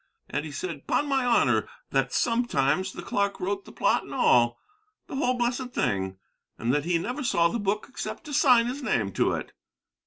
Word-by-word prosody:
And 150 - -2
he 155 - -6
said, 145 -1 -6
'pon 290 - +1
my 270 -2 +1
honor, 245 -1 +3 0.2
that - - +1
sometimes 190 - +1
the - - -8
clark 200 0 -1
wrote 200 +2 -2
the - - -12
plot - - +2
and - - -9
all, 120 0 +4 0.5
the 305 - -7
whole 255 -2 +1
blessed 245 +1 -1
thing, 95 -1 -1 0.4
and 120 +3 0
that 145 +1 0
he 175 0 +2
never 250 - -3
saw 170 -9 +3
the 235 - -2
book 205 +1 -1
except 260 - -6
to 300 -2 -8
sign 250 -4 +5
his 255 +4 -4
name 115 - 0
to - - +1
it." - - -4
200 Hz, 195 wpm, -27 LUFS, 150-250 Hz, 0.5 s, sign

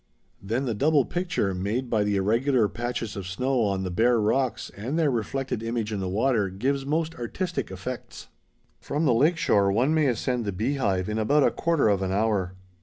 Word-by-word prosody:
Then 115 +7 -2
the 120 - -1
double 145 +4 +3
picture, 175 - -1
made 105 +8 -2
by 110 -3 +1
the 105 0 0
irregular 115 +4 +2
patches 120 +1 -4
of 100 -3 -5
snow 125 +7 0
on 100 -3 0
the 90 - -3
bare 115 +5 +3
rocks 110 +2 0
and 120 +10 -3
their 155 -4 +2
reflected 120 +1 -2
image 115 -1 -2
in 100 - -2
the 95 -1 -2
water, 110 0 +1
gives 135 +8 -2
most 160 +2 0
artistic 175 +9 -3
effects. 95 +7 -7 0.5
From 150 +3 -2
the 130 - +4
lake 155 +9 +3
shore 100 -10 +3
one 125 +9 +2
may 155 -2 +3
ascend 125 0 -1
the 100 - -1
Beehive 100 -3 -1
in 105 +1 -2
about 145 +7 +3
a - - +4
quarter 165 -7 +1
of 100 -2 +2
an 95 -1 -1
hour. 100 -3 0
115 Hz, 195 wpm, -26 LUFS, 100-135 Hz, 0.5 s, the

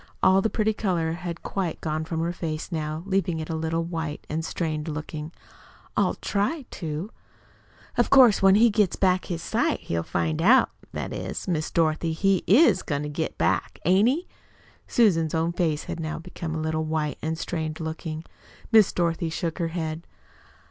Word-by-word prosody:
All 190 +1 +6
the 220 - +1
pretty 220 0 +1
color 175 -6 0
had 170 0 -5
quite 185 -5 -2
gone 155 0 -2
from 160 0 -2
her 170 +1 -1
face 160 -1 -4
now, 155 0 -3
leaving 190 -4 0
it 155 +1 -5
a - - -1
little 160 +1 -1
white 165 -3 -4
and 160 +1 -1
strained 160 -1 -3
looking. 150 0 -5 0.6
"I'll - - +2
try 245 +9 -1
to." 165 +4 -5 0.9
"Of 240 - +3
course, 255 -6 +7
when 195 0 +6
he 230 +2 +5
gets 205 -3 +2
back 185 -1 +2
his 170 -2 -4
sight - - 0
he'll 85 0 -2
find 80 -1 -1
out - - +5 0.2
that - - -4
is, - - -5
Miss 160 -4 -1
Dorothy, 160 0 +1
he 195 +2 +2
IS 210 - +6
going 145 -1 -2
to 150 - -4
get 155 +2 -3
it - - -41
back, - - 0
ain't 190 +6 +5
he?" 320 +8 -1 0.6
Susan's 165 -9 +3
own 165 +1 +1
face 160 -4 -1
now 155 -2 -4
had 165 - -7
become 170 -2 -5
a 160 - -2
little 155 0 -1
white 155 -1 -2
and 160 +1 -2
strained 160 -2 -3
looking. 160 0 -5 0.5
Miss 220 -4 +6
Dorothy 170 -1 0
shook 165 +2 -3
her 170 - 0
head. 160 -1 -4
165 Hz, 185 wpm, -25 LUFS, 155-185 Hz, 0.9 s, course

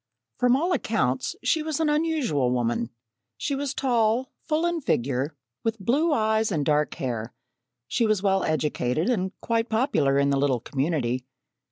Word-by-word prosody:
From 245 0 +4
all 340 +6 +1
accounts, - - 0
she 320 - +2
was 310 -1 -2
an 320 - +2
unusual 295 - +1
woman. 120 -1 0 0.5
She 285 - -2
was 280 0 -2
tall, 240 -1 +1
full 320 +1 0
in 345 -1 0
figure, 135 - 0 0.3
with 225 0 -1
blue 275 - +1
eyes 220 -4 +2
and 150 -5 0
dark 150 -1 +1
hair; 120 -3 -4 0.5
she 230 - +1
was 215 -2 +1
well 195 -1 +2
educated 155 - 0
and 190 -5 0
quite 230 0 0
popular 220 - +2
in 140 0 +3
the 140 - +2
little 135 -3 +2
community. 130 -1 -1
215 Hz, 160 wpm, -25 LUFS, -, 0.5 s, From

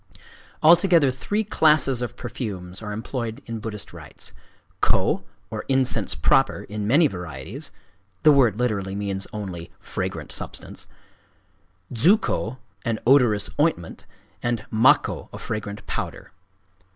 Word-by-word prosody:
Altogether 170 -3 +6
three 205 +12 -2
classes 150 - +3
of 125 0 -4
perfumes 95 -7 -5
are 105 -1 -5
employed 115 +1 -4
in 115 -1 -5
Buddhist 105 -1 -6
rites: - - -10 0.5
kō, 95 - +2 0.3
or 110 -1 -4
incense 130 -2 +2
proper, - - +2
in 105 0 -4
many 145 +8 +5
varieties—(the 90 - -3
word 125 -8 +4
literally 100 -6 -1
means 100 -1 -3
only 95 -5 -6
"fragrant - - -4
substance");—dzukō, 115 - -3 0.3
an 115 -1 0
odorous 120 -6 +4
ointment; 145 - 0 0.3
and 120 -1 -1
makkō, 115 +4 +3
a - - -7
fragrant 105 -1 -5
powder. - - -5
110 Hz, 110 wpm, -24 LUFS, 100-135 Hz, 0.5 s, Altogether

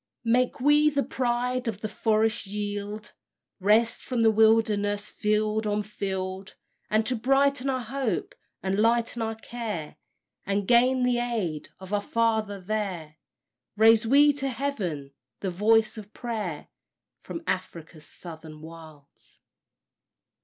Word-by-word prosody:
"Make 245 +2 +2
we 295 +3 +5
the 280 -2 0
pride 250 0 -1
of 215 -2 -3
the 215 - -2
forest 220 0 0
yield; 205 +1 -5 0.5
Wrest 215 +4 +3
from 245 -3 -1
the 225 -1 +5
wilderness 210 -2 +2
field 215 +1 0
on 210 0 0
field; 190 -2 -5 0.3
And 215 +1 +2
to 250 - 0
brighten 275 +3 +2
our 260 -1 0
hope, 245 -3 -2 0.3
and 190 +1 0
lighten 230 +1 +2
our 225 0 -2
care, 220 -8 -6 0.5
And 200 0 -1
gain 250 +2 +4
the 250 -1 +2
aid 215 -11 -2
of 190 +1 -9
our 205 - +2
Father 220 -2 0
there, 185 -6 -4 0.6
Raise 225 +1 +6
we 290 +4 +6
to 275 -1 -1
heaven 200 - -3 0.3
the 190 - -2
voice 220 +4 +3
of 210 0 -12
prayer 215 -10 -4 0.5
From 335 - -7
Afric's 165 -4 -5
Southern 160 -2 -10
Wilds." 160 -3 -14
215 Hz, 130 wpm, -27 LUFS, 195-240 Hz, 0.6 s, Raise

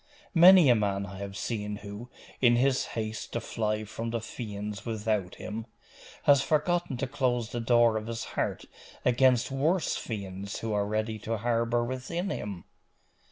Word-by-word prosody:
Many 180 -1 +8
a 125 - +7
man 100 -3 0
I 95 -1 -9
have 100 0 -6
seen 105 -3 -3
who, 105 +4 -8 0.3
in 120 -2 +6
his 130 +2 +2
haste 110 0 -4
to 115 - 0
fly 110 -1 -2
from 115 +2 -5
the 115 0 -1
fiends 105 -2 -6
without 105 -4 -2
him, 110 +1 -6 0.6
has 140 -2 +6
forgotten 160 0 0
to 135 - -1
close 125 -4 -1
the 120 - -3
door 120 -1 +4
of 110 0 -5
his 115 0 -4
heart - - -2 0.4
against 125 0 +3
worse 155 +6 +1
fiends 100 -3 -5
who 115 - -3
were 100 -1 0
ready 110 +1 -2
to 115 +2 -2
harbour 115 +1 +1
within 150 +10 -3
him. 100 -4 -5
115 Hz, 160 wpm, -29 LUFS, 105-125 Hz, 0.6 s, Many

